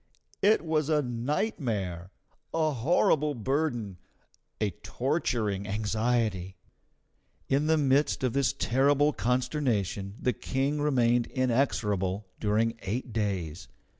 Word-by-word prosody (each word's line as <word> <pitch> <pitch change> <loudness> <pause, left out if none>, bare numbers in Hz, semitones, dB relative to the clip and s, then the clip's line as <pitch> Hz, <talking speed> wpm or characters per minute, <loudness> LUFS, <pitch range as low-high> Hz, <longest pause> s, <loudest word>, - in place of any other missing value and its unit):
It 205 -3 +4
was 155 -2 0
a 150 -2 +3
nightmare, 115 - -2 0.5
a 155 -1 +2
horrible 150 +2 +2
burden, 120 - -1 0.6
a 105 -2 0
torturing 105 - -1
anxiety. 110 -2 -1 0.9
In 140 +3 +2
the 160 0 +4
midst 140 -1 +2
of 125 -3 +1
this 135 -2 +2
terrible 140 +4 +2
consternation 120 - -1
the 125 - +1
King 135 +6 -1
remained 120 -5 +2
inexorable 105 -7 0
during 115 +2 +1
eight 115 +4 -4
days. 95 -7 -2
120 Hz, 105 wpm, -28 LUFS, 105-145 Hz, 0.9 s, It